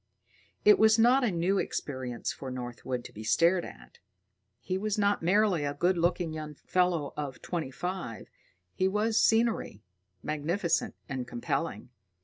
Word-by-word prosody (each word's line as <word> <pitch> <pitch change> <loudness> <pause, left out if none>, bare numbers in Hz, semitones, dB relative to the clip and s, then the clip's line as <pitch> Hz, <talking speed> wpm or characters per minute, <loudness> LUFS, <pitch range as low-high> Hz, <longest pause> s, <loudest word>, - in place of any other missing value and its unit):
It 420 -1 +7
was 220 0 +6
not 245 +4 +5
a 240 - +3
new 185 +2 +1
experience 130 -4 -3
for 135 - -7
Northwood 125 0 -5
to - - -10
be 110 - -8
stared 170 +9 +3
at: - - -12 0.6
he 185 - -3
was 210 +2 -1
not 205 -1 +2
merely 185 -1 +3
a 145 0 -2
good 180 +5 +2
looking 170 -1 0
young 155 -1 -6
fellow 175 -3 0
of 145 -3 -5
twenty 165 -6 -3
five, 175 - -5 0.5
he 185 - +1
was 215 +3 +2
scenery, 225 - +1 0.4
magnificent 165 +4 -1
and 130 -3 -4
compelling. 135 +5 -3
170 Hz, 145 wpm, -29 LUFS, 135-195 Hz, 0.6 s, It